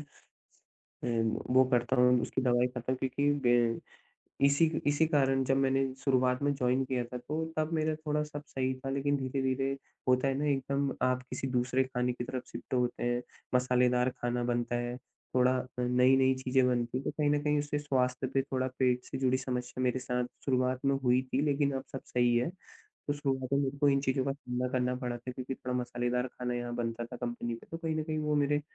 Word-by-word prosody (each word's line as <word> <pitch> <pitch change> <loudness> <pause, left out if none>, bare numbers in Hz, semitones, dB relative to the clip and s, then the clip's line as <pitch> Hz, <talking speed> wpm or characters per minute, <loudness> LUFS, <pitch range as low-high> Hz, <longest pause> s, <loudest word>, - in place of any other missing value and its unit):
अ, 150 - -9 1.5
वो 130 - +7
करता 120 +1 +2
हूँ 125 0 +5
उसकी - - -2
दवाई 125 0 +3
करता 125 0 -4
हूँ 130 - 0
क्योंकि 140 +3 +1 0.2
ग 120 -1 +3 0.7
इसी, 140 +4 +5 0.2
इसी 145 +2 +3
कारण 135 -3 +2
जब 135 +1 +2
मैंने 135 0 +2 0.2
शुरुआत 130 -1 +2
में 145 0 +2
जॉइन 130 0 +1
किया 125 -2 -1
था 125 +1 -6
तो, 155 +6 -3
तब 155 0 +1
मेरा 155 0 +1
थोड़ा 150 -1 -1
सब 150 -1 -7
सही 130 0 -1
था 135 0 -5
लेकिन 140 +1 +1
धीरे-धीरे 130 0 -1 0.4
होता 130 +1 +3
है 135 - +1
ना 150 - -1
एकदम 140 0 0
आप 125 0 +1
किसी 135 - -3
दूसरे 125 +1 +2
खाने 125 -1 -1
की 120 - -5
तरफ 125 0 -4
शिफ्ट - - -7
होते 125 -1 0
हैं, 120 0 +1 0.3
मसालेदार 125 0 +3
खाना 120 0 0
बनता 120 0 0
है 120 0 -3 0.4
थोड़ा 125 0 +5 0.3
नई-नई 130 +2 +4
चीजें 130 0 +3
बनती 120 0 0
हैं, 135 - -5
तो - - 0
कहीं 150 -1 0
न 145 0 +3
कहीं 150 0 +2
उससे 145 0 -2
स्वास्थ्य 130 -2 0
पे 135 - +3
थोड़ा 130 -1 -2
पेट 125 -1 +2
से 135 - -5
जुड़ी 130 -1 +2
समस्या 125 -1 -3
मेरे 125 +1 +1
साथ 125 0 -1 0.2
शुरुआत 130 -1 +1
में 140 0 +3
हुई 125 +1 +4
थी 135 - +3
लेकिन 140 -1 +2
अब 130 - -5
सब 135 - -5
सही 120 -1 +2
है। 125 +7 +1 0.6
तो 145 - +1
शुरुआत 135 -2 -2
में 140 - +4
मेरे 140 0 -1
को 145 0 +3
इन 135 0 +3
चीज़ों 130 -1 +1
का 140 - +1
सामना 125 -2 -3
करना 125 -1 +1
पड़ा 125 -1 -3
था 125 +2 -7
क्योंकि 130 +1 -5
थोड़ा 125 -1 -4
मसालेदार 125 +1 -1
खाना 125 0 -4
यहाँ 120 0 -3
बनता 120 0 -2
था 125 - -9
कंपनी 120 -1 -3
में, 115 - -6
तो 165 - -4
कहीं 160 -1 -2
न 155 - -1
कहीं 155 -1 -3
वो 150 -1 0
मेरे 145 0 +2
130 Hz, 210 wpm, -31 LUFS, 125-140 Hz, 1.5 s, वो